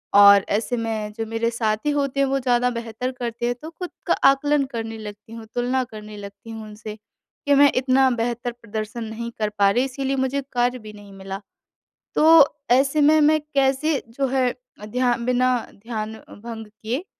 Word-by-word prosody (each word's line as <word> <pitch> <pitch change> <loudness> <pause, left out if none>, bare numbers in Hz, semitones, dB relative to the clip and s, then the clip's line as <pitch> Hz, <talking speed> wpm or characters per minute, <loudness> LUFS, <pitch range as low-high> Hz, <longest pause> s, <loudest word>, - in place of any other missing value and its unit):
और 200 -1 +8
ऐसे 225 +4 0
में 220 -2 -3
जो 225 +1 -4
मेरे 225 +1 -1
साथी 220 +3 -1
होते 280 -1 -1
हैं 275 - +4
वो 270 0 +1
ज़्यादा 245 -1 +2
बेहतर 235 +2 -4
करते 240 -2 -4
हैं, 245 0 0
तो 315 - -7
खुद 355 +2 -7 0.2
का - - +4 0.2
आकलन 290 +1 +2
करने 225 -1 -4
लगती 210 0 -10
हूँ, 230 -1 -8
तुलना 250 +2 +1
करने 215 -3 -10
लगती 200 +3 -11
हूँ 225 -1 -7
उनसे, 215 0 -8
कि 280 +6 -5
मैं 285 0 +6
इतना 260 +1 +3
बेहतर 240 0 -2
प्रदर्शन 230 0 -6
नहीं 225 +2 -5
कर 215 -1 0
पा 200 - +6
रही 245 +5 +2
इसीलिए 270 0 -2
मुझे 265 +1 0
कार्य 245 +1 +1
भी 215 -2 -11
नहीं 205 -1 -13
मिला, 195 0 -7 0.7
तो 320 -2 +7 0.3
ऐसे 270 +3 +2
में 305 +1 +5
मैं 310 +1 +4
कैसे 275 +2 +2
जो 270 +4 -2
है 255 -1 +2 0.3
अ, 210 - -8
ध्या 245 +2 +1
बिना 250 0 +2 0.2
ध्यान 220 0 -5 0.3
भंग 225 -2 -7
किए 220 - -5
240 Hz, 185 wpm, -23 LUFS, 220-265 Hz, 0.7 s, और